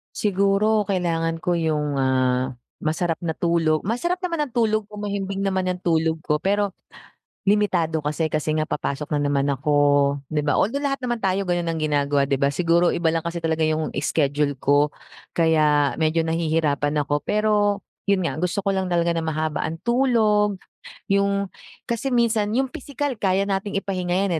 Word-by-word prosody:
Siguro 205 +2 +2
kailangan 165 -3 0
ko 175 +1 0
yung, 150 -3 0
ah, 130 -1 +1 0.3
masarap 160 +1 -1
na 165 -2 -3
tulog 165 -2 +1
masarap 245 - 0
naman 335 -4 -1
ng - - -24
tulog 215 -2 +2
ko, 210 - -11
mahimbing 200 -1 -3
naman 190 -1 0
ng 180 0 -4
tulog 160 -1 +2
ko 150 0 0
pero 200 0 +1 0.8
limitado 175 -7 +2
kasi 155 +2 -1
kasi 155 0 -1
nga 155 0 0
papasok 145 0 -3
na 145 - 0
naman 140 -1 +1
ako 140 +2 -1 0.6
di 150 -1 -1
ba? 145 - +1
Although 280 +8 0
lahat 275 -1 0
naman 240 -4 -3
tayo 190 0 0
gano'n 175 -1 0
ang 160 - -3
ginagawa 145 -2 +1
di 140 - +1
ba, 140 +1 +1
siguro 170 +2 +2
iba 170 -1 0
lang 165 - -1
kasi 170 0 -3
talaga 160 -1 0
yung 155 0 0
schedule 145 -1 0
ko 145 +1 +3 0.4
kaya 150 -3 +3
medyo 160 +1 +1
nahihirapan 155 -3 0
ako. 145 0 0
Pero 210 -1 +1 0.2
'yon 200 -2 +2
nga - - -3
gusto 180 +4 -1
ko 195 0 0
lang 190 -1 -2
talaga 170 0 +1
na 165 - -1
mahaba 155 -1 -2
ang 160 +1 -4
tulog 215 -4 +2 0.5
yung 200 -1 +1 0.3
kasi 235 +3 -2
minsan 230 -4 +2
yung 265 -1 0
pisikal 285 +1 -3
kaya 195 0 +2
nating 200 0 -2
ipahinga 185 -3 -2
yan, 190 - -1
170 Hz, 170 wpm, -23 LUFS, 155-200 Hz, 0.8 s, ko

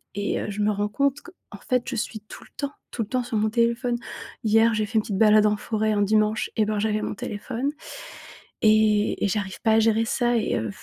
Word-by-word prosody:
et 205 0 -1
heu, - - -4
je 205 +1 -4
me 210 +1 +2
rends 205 0 -1
compte 280 +6 0
qu 350 - -13 0.2
en 200 - -8
fait, 250 +4 -1
je 260 - -4
suis 215 0 -4
tout 215 - -12
le - - -20
temps 280 -1 -3 0.2
tout 235 - -4
le 215 - -4
temps 255 -1 0
sur 235 - -5
mon 215 +1 +1
téléphone. 235 +2 +1 0.5
Hier, 225 +1 +4
j'ai 215 0 0
fait 210 - -12
une - - +4
petite 205 -2 -4
balade 215 0 +5
en 210 0 +2
forêt 220 0 -1
un 205 -1 +1
dimanche, 215 +1 +1
et 220 - +2
ben 215 0 -1
j'avais 215 0 0
mon - - -3
téléphone. 230 +7 -4 0.9
Et 215 -1 +3
et - - +2
j'arrive 190 -3 -3
pas 220 - +2
à 220 - +5
gérer 225 0 +2
ça 240 +1 +1
et 220 - 0
heu,, 110 - -3
215 Hz, 245 wpm, -24 LUFS, 210-230 Hz, 0.9 s, balade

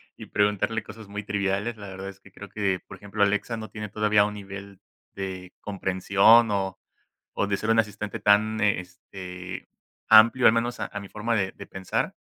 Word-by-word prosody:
y - - -11
preguntarle 105 +2 0
cosas 110 0 -11
muy 105 +1 -6
triviales, 100 +3 -1
la 100 -2 -10
verdad 95 0 -7
es 95 0 -12
que - - -19
creo 100 - -10
que, 100 -3 -1
por - - -10
ejemplo, 100 0 -1
Alexa 105 +3 0
no 110 0 -8
tiene 105 -1 -6
todavía 105 0 +3
un 105 0 -4
nivel 100 -1 -9 0.4
de 95 -2 -6
comprensión 100 +3 +4
o 95 -2 -1 0.6
o 100 - 0
de 100 -1 0
ser 110 - -4
un 115 - +4
asistente 105 -1 -2
tan, 110 +1 +3
eh, 100 -3 +3
este 90 0 -9 0.4
amplio, 115 +3 +7
al - - +8
menos 120 +1 -1
a - - -2
a 105 - -5
mi 100 -1 -10
forma 115 +2 -2
de 95 -2 0
de - - -11
pensar, 95 -1 -3
100 Hz, 195 wpm, -26 LUFS, 95-110 Hz, 0.6 s, al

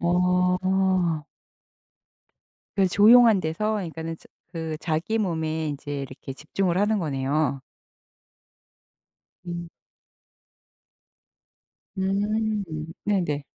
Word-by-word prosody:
어. 180 -1 +2 1.5
그래서 190 -2 +3
조용한 225 -1 +7
데서 210 +6 -1
이 165 - -5
그러니까는 165 0 -5
저 - - -20 0.2
그 160 -2 -4
자기 170 +8 -1
몸에 160 -5 -1
인제 145 0 -5
이렇게 135 0 -8
집중을 175 +5 -1
하는 210 +1 +2
거네요. 140 -2 0 1.8
음. 170 -1 -5 2.3
음 210 +2 0 0.4
네네. 175 -8 0
175 Hz, 170 characters per minute, -25 LUFS, 160-195 Hz, 2.3 s, 조용한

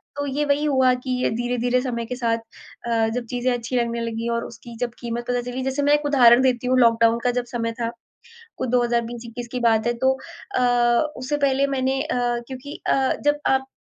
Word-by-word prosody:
तो 285 - -2
ये 285 +2 -1
वही 285 +1 +1
हुआ 260 -3 +3
कि 260 - -3
ये - - +2
धीरे-धीरे 245 +1 0
समय 235 -3 -3
के 250 +2 -5
साथ 230 -2 0 0.5
अ, 225 -1 +2
जब 245 - -3
चीज़ें 250 +1 0
अच्छी 245 +1 -4
लगने 235 -1 0
लगी 230 0 -3
और 235 0 -2
उसकी 235 0 -11
जब 240 - -1
कीमत 240 0 -4
पता 245 0 0
चली। 250 +1 -5
जैसे 265 +2 -1
मैं 290 +1 +4
एक 295 0 +2
उदाहरण 250 -4 +6
देती 250 -1 +1
हूँ, 255 - +3
लॉक 230 -2 +5
डाउन 230 0 +4
का 245 - +2
जब 245 0 -2
समय 230 -1 -3
था। 230 - 0 0.7
कुछ 260 - -3
2020-21 240 -1 -1
की 250 - -2
बात 225 -1 +2
है 240 - +2
तो 265 - +5 0.4
अ, - - +2 0.6
उससे 255 +4 -2
पहले 275 +1 +2
मैंने 265 0 0
अ, 305 - -3 0.3
क्योंकि 265 +3 -8
अ, 265 -1 +2
जब 290 0 +3
आप 265 0 +2
245 Hz, 215 wpm, -23 LUFS, 235-265 Hz, 0.7 s, उदाहरण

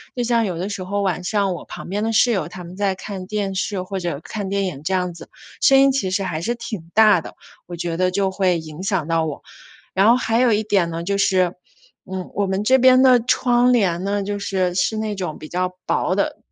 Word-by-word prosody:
就 245 - -1
像 235 -1 +2
有 180 -4 -3
的 180 +3 -3
时 200 -2 -5
候， 200 +2 -2
晚 180 -2 -1
上 200 0 0
我 175 - -7
旁 - - -9
边 205 +3 -2
的 225 - 0
室 240 +2 +4
友， 190 -8 -1
她 180 +1 -9
们 175 +1 -10
在 195 -1 0
看 190 -1 -7
电 205 -1 -2
视， 190 0 -2
或 190 +1 -4
者 170 -6 -3
看 205 -3 -5
电 200 0 0
影 155 -7 -5
这 190 +4 0
样 180 -1 -1
子， 170 - -12 0.3
声 270 -1 +6
音 275 0 +5
其 260 -8 -1
实 195 +2 -1
还 165 -4 -3
是 235 +7 -1
挺 215 -8 -7
大 215 -5 +6
的， - - -11 0.3
我 175 - -7
觉 170 -1 -3
得 185 +1 +2
就 195 0 0
会 190 -2 +1
影 155 +1 -9
响 190 -5 -1
到 165 -1 +1
我。 150 - -6 0.5
然 195 +3 +4
后 235 - +6
还 230 -2 0
有 250 -1 +4
一 215 0 +2
点 200 -5 +1
呢， 165 0 -4
就 200 +3 -1
是， 185 -2 +2 0.6
嗯， 185 -1 -5
我 200 0 0
们 190 +2 -1
这 260 +4 +4
边 255 0 +6
的 255 -2 +6
窗 245 +1 +2
帘 185 -7 +1
呢， 200 +1 -1
就 205 +1 -3
是， 185 -3 -1
是 190 +4 0
那 215 -1 -2
种 180 -5 -4
比 155 - -10
较 180 +1 -2
薄 - - 0
的， - - -1
195 Hz, 265 characters per minute, -21 LUFS, 180-215 Hz, 0.6 s, 声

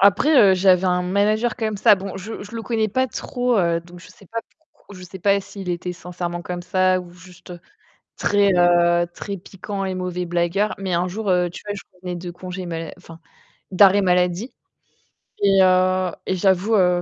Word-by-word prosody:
Après, 200 +11 +4 0.2
heu, - - +4
j'avais 185 0 +3
un 180 0 +1
manager 210 +5 +1
comme 215 -2 -2
ça. 200 - +6
Bon, 195 0 -7
je 205 +3 -7
je 205 +3 -11
le 225 - -5
connais 220 -1 -1
pas 260 +6 0
trop, 245 -1 -2
heu, 170 -2 +1
donc 175 +1 -14
je - - -14
sais 195 - -18
pas 230 +5 -4 0.3
pourquoi 200 - -16
je - - -11
sais 185 +2 -10
pas 200 +2 +2
s'il 195 -1 -9
était 180 0 -3
sincèrement 175 0 -6
comme 175 +1 -5
ça 185 +1 +1
ou 180 -1 -12
juste 180 0 -14 0.6
très, 205 -1 +2
heu, 175 0 +4
très 200 -1 -6
piquant 195 +2 -6
et 190 -1 -3
mauvais 180 -1 -3
blagueur. 175 +4 0
Mais 190 -2 -2
un 175 +2 0
jour, 210 +3 -5
heu, 180 -1 +2
tu 175 - -10
vois, 205 - -3
je 200 - -8
revenais 180 -1 -6
de 175 0 -7
congés 180 +1 -7
mal 165 -1 -5
enfin, 165 -2 -14 0.5
d'arrêt 195 +1 +6
maladie 180 +4 +1 0.9
et 195 -1 +4
heu 185 0 +3 0.2
et - - 0
j'avoue, 190 +3 +2
heu, 180 -3 +3
185 Hz, 200 wpm, -21 LUFS, 175-200 Hz, 0.9 s, ça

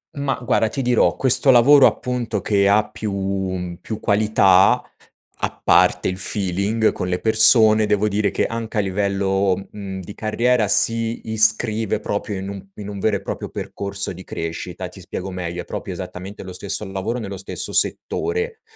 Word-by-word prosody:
Mah, 140 -1 -2
guarda, 110 -1 +1
ti 135 +5 -3
dirò, 120 -2 +2
questo 130 +1 +6
lavoro, 130 +3 +6
appunto, 120 -4 -3
che 100 0 +1
ha 105 +1 +2
più 105 0 -6
mhmm, 95 -2 -4
più 110 - -6
qualità, 100 -3 +3 0.6
a - - -4
parte - - +3
il 95 0 -3
feeling 100 +3 0
con 90 - -5
le 90 0 -1
persone, 110 0 +5
devo 105 0 +1
dire 105 0 0
che, - - -1
anche 115 -1 -5
a 105 - +3
livello, 95 0 -1 0.2
mhmm, 95 -2 -7
di 95 +3 -10
carriera 115 +1 0
si 115 +1 +4
iscrive 110 0 +2
proprio 100 0 -4
in 95 0 -6
un 100 -1 -7
in 105 -1 -8
un 100 -1 -7
vero 105 +1 0
e - - -4
proprio - - -6
percorso 100 0 -5
di 90 +1 -11
crescita. 85 +2 -6
Ti 90 - -13
spiego 95 0 -7
meglio: 90 -1 -5
è - - -20
proprio - - -6
esattamente 95 +3 -8
lo 95 - -9
stesso 100 +3 -3
lavoro, 95 +5 -4
nello 100 -4 -6
stesso 95 - -2
settore, 450 +1 -1
105 Hz, 175 wpm, -20 LUFS, 95-110 Hz, 0.6 s, questo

